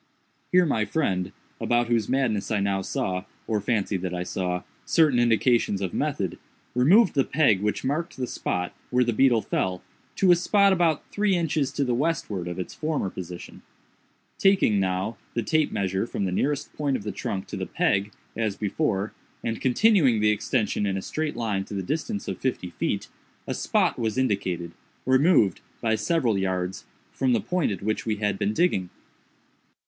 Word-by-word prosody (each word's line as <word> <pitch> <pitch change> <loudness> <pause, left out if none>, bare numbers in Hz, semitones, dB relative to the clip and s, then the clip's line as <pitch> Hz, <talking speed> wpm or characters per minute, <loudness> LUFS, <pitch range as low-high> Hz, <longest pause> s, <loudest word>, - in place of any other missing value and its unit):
Here 180 0 +5
my 115 -8 +1
friend, 95 - -1 0.3
about 120 0 +2
whose 115 -3 0
madness 125 -6 0
I 110 - +1
now 100 -1 0
saw, 95 0 -2 0.2
or 110 -2 -1
fancied 100 -3 0
that 90 -1 -3
I 90 - -2
saw, 90 0 -2 0.2
certain 150 -7 +3
indications 120 -3 +3
of 95 -3 -3
method, - - -2 0.3
removed 175 - +5
the 140 - +3
peg 130 -11 +3
which 105 0 -1
marked 155 +6 -2
the 130 - -1
spot 90 -6 -3 0.2
where 125 0 +3
the 120 -1 0
beetle 120 -1 +4
fell, 90 -1 -1 0.3
to 190 -2 +4
a - - +8
spot 200 +3 +4
about 170 -4 +1
three 205 -2 +2
inches 155 -5 0
to 140 - 0
the 125 -2 0
westward 120 - -1
of 90 0 -5
its 90 - -5
former 150 -11 -2
position. 90 -1 -8 0.8
Taking, 190 - +4
now, 95 +3 -1 0.2
the 120 - 0
tape 155 +8 +1
measure 95 +2 -1
from 100 - -2
the 95 - -1
nearest 145 +9 -1
point 140 -3 0
of - - -9
the 105 - -3
trunk 95 -2 -4
to - - -5
the - - -4
peg, 100 +2 +1 0.2
as 110 -3 -1
before, 105 -1 -1 0.3
and 115 -1 -3
continuing 135 - +4
the 105 0 +4
extension 105 -1 0
in 95 -1 -1
a 95 - -4
straight 155 -3 -3
line 110 -5 -1
to 100 - -7
the 95 - -2
distance 165 - -3
of - - -4
fifty 120 -9 -2
feet, - - -2 0.4
a - - -3
spot - - +1
was 110 -1 -1
indicated, 95 -9 -1 0.3
removed, 130 - +4 0.2
by 115 -1 +1
several 115 -2 +1
yards, 95 -1 -2 0.2
from 130 -2 +1
the 115 - +3
point 155 - 0
at 95 -2 -5
which 110 +1 -1
we 110 - +1
had 105 -1 -1
been 100 0 +1
digging. 110 - +1
110 Hz, 180 wpm, -25 LUFS, 95-145 Hz, 0.8 s, a